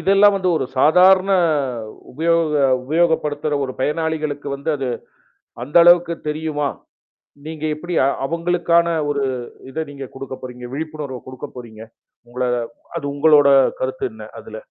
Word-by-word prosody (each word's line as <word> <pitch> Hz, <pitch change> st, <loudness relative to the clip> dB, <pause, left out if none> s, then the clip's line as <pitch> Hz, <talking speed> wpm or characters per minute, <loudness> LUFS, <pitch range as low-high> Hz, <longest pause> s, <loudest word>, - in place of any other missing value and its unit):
இதெல்லாம் 200 Hz, +1 st, +5 dB
வந்து 185 Hz, -2 st, -1 dB
ஒரு 130 Hz, -, -1 dB
சாதாரண 185 Hz, +5 st, +5 dB, 0.8 s
உபயோக 160 Hz, -1 st, +1 dB, 0.2 s
உபயோகப்படுத்துற 155 Hz, -1 st, 0 dB
ஒரு 130 Hz, -, -5 dB
பயனாளிகளுக்கு 150 Hz, -1 st, -2 dB
வந்து 150 Hz, +4 st, -3 dB
அது 135 Hz, -2 st, -3 dB, 0.8 s
அந்த 145 Hz, +5 st, -5 dB
அளவுக்கு 175 Hz, -1 st, +5 dB
தெரியுமா? 150 Hz, -2 st, -2 dB, 0.8 s
நீங்க 155 Hz, -1 st, -7 dB
எப்டி 175 Hz, +3 st, -6 dB
அ -, -, +3 dB, 0.2 s
அவங்களுக்கான 170 Hz, +2 st, +1 dB, 0.2 s
ஒரு 140 Hz, -1 st, -1 dB, 0.5 s
இத 135 Hz, -, -5 dB
நீங்க 140 Hz, -1 st, -7 dB
குடுக்க 135 Hz, 0 st, -7 dB
போறீங்க? 125 Hz, -1 st, -8 dB
விழிப்புணர்வு 150 Hz, -3 st, -5 dB
குடுக்கப் 130 Hz, -1 st, -9 dB
போறீங்க? 115 Hz, -3 st, -10 dB, 0.5 s
உங்கள 125 Hz, +1 st, -3 dB, 0.5 s
அது -, -, -5 dB
உங்களோட 145 Hz, -1 st, +5 dB, 0.3 s
கருத்து -, -, -2 dB
என்ன -, -, -11 dB, 0.2 s
அதுல? -, -, -10 dB
155 Hz, 125 wpm, -20 LUFS, 140-170 Hz, 0.8 s, இதெல்லாம்